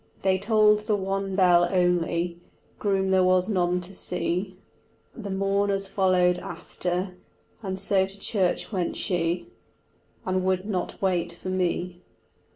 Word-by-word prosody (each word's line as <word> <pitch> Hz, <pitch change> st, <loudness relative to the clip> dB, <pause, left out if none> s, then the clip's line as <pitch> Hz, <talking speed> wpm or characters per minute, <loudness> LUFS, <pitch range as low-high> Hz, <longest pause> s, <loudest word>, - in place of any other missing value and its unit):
They 190 Hz, -1 st, +2 dB
tolled 210 Hz, 0 st, +4 dB
the 210 Hz, 0 st, 0 dB
one 195 Hz, 0 st, -2 dB
bell 175 Hz, -2 st, +5 dB
only, 175 Hz, -1 st, +1 dB, 0.4 s
Groom 195 Hz, -2 st, +1 dB
there 190 Hz, -1 st, +4 dB
was 185 Hz, 0 st, +3 dB
none 180 Hz, -3 st, +1 dB
to 180 Hz, +2 st, -7 dB
see, 180 Hz, +1 st, -2 dB, 0.6 s
The 210 Hz, -5 st, -7 dB
mourners 195 Hz, 0 st, 0 dB
followed 185 Hz, -2 st, +2 dB
after, 180 Hz, +1 st, -4 dB, 0.4 s
And 190 Hz, -3 st, -4 dB
so 190 Hz, -1 st, +2 dB
to 195 Hz, +1 st, -12 dB
church 195 Hz, -1 st, 0 dB
went 185 Hz, -4 st, -1 dB
she, 175 Hz, -2 st, -1 dB, 0.8 s
And 185 Hz, 0 st, 0 dB
would 185 Hz, 0 st, 0 dB
not 195 Hz, -4 st, -3 dB
wait 180 Hz, -3 st, 0 dB
for 180 Hz, +2 st, -7 dB
me. 180 Hz, -1 st, -1 dB
185 Hz, 135 wpm, -26 LUFS, 180-195 Hz, 0.8 s, bell